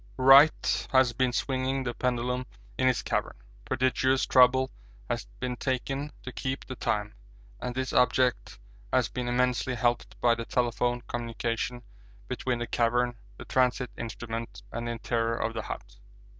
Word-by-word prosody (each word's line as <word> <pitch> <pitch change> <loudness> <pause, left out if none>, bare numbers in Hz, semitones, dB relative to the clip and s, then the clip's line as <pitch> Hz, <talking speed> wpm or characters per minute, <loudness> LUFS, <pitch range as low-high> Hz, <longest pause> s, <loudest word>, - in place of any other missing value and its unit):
Wright 135 +4 +6
has 130 -3 +4
been 130 +1 +1
swinging 130 +1 -1
the 120 -1 -2
pendulum 125 +1 -1 0.3
in 130 - +2
his 130 -1 +2
cavern. - - -2 0.3
Prodigious 130 +1 +2
trouble 130 +1 +5 0.4
has - - -2
been 125 -1 -2
taken 135 +3 -2
to 130 - -6
keep 130 +1 -4
the 130 - -6
time, 105 -3 -1 0.5
and 125 - -4
this 130 0 -2
object 125 0 +2 0.3
has - - +2
been 125 -1 -4
immensely 125 +1 +1
helped 120 +1 -1
by 120 -1 +4
the 115 0 -4
telephone 120 0 0
communication 120 +1 -3 0.4
between 125 -2 -2
the 120 - -3
cavern, 120 +1 +1 0.2
the - - -9
transit 125 -1 +1
instrument, 115 0 -6
and 120 +1 -4
the - - -1
interior 115 0 -1
of 115 - -2
the 110 - -3
hut. - - -8
125 Hz, 150 wpm, -28 LUFS, 120-130 Hz, 0.5 s, Wright